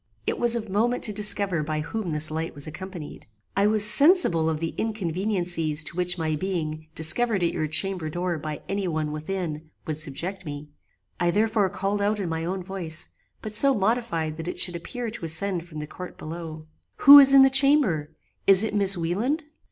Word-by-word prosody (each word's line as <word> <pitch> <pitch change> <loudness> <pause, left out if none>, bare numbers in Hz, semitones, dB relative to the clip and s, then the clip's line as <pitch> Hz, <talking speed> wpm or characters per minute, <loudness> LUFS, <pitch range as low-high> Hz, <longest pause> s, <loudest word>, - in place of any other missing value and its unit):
It - - -2
was 240 0 +2
of 225 -2 -4
moment 225 +6 -1
to 210 - +1
discover 200 -4 0
by 155 0 -3
whom 205 +4 -5
this 155 0 0
light 160 +1 -4
was 145 - -5
accompanied. 175 0 -9 0.3
I 200 +1 +3
was 210 -1 +2
sensible 215 - +5
of 155 -1 -2
the 165 0 -4
inconveniencies 180 -6 -2
to 155 - -6
which 180 0 -1
my 160 -2 -1
being 155 -3 -4
discovered 195 +5 +2
at 170 - +1
your 155 - -2
chamber 180 +1 -1
door 175 0 -3
by 150 0 -6
any 195 -1 -2
one 155 -2 -2
within 155 -1 -5 0.2
would 155 -2 -4
subject 170 +6 -4
me; 150 -2 -8 0.5
I 175 -1 +1
therefore 210 +1 +1
called 200 +3 -3
out 210 +1 0
in 185 -4 -3
my 160 0 -3
own 185 +1 -4
voice, 175 -4 -4 0.3
but 215 -1 -6
so 275 +5 +7
modified 195 -7 -1
that 165 +1 -7
it 180 - -5
should 180 -1 +1
appear 235 +7 -6
to 215 - -10
ascend 170 +2 0
from 155 -3 -11
the 150 - -5
court 180 +4 -10
below, 160 -1 -8 0.3
'Who 285 +1 +9
is 275 -1 +7
in 270 - +9
the 270 - +4
chamber? 265 - +3 0.4
Is 195 +1 +6
it 220 - -3
Miss 200 -2 +2
Wieland?" 215 - -2
180 Hz, 195 wpm, -24 LUFS, 160-210 Hz, 0.5 s, Who